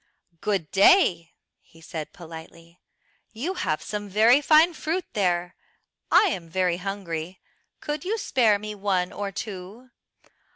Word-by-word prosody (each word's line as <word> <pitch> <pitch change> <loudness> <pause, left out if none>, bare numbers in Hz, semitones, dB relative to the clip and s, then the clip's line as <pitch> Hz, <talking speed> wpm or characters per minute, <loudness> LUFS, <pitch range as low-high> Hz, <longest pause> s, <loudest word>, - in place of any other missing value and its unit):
"Good 190 -7 -2
day," 190 - +4 0.3
he 165 - -21
said 160 -2 -7
politely, 165 0 -12 0.5
"you 280 +12 -3
have 155 - -2
some 205 -1 -5
very 225 +8 +5
fine 315 +3 +5
fruit 330 +3 -3
there! 180 -4 0 0.6
I - - +7
am 170 - -5
very 180 0 0
hungry, 180 -3 -5 0.4
could 295 0 -4
you 425 +5 -1
spare 235 - +2
me 210 +1 -6
one 195 -3 -1
or 200 -1 -4
two?" 205 +5 -8
195 Hz, 130 wpm, -25 LUFS, 175-240 Hz, 0.6 s, I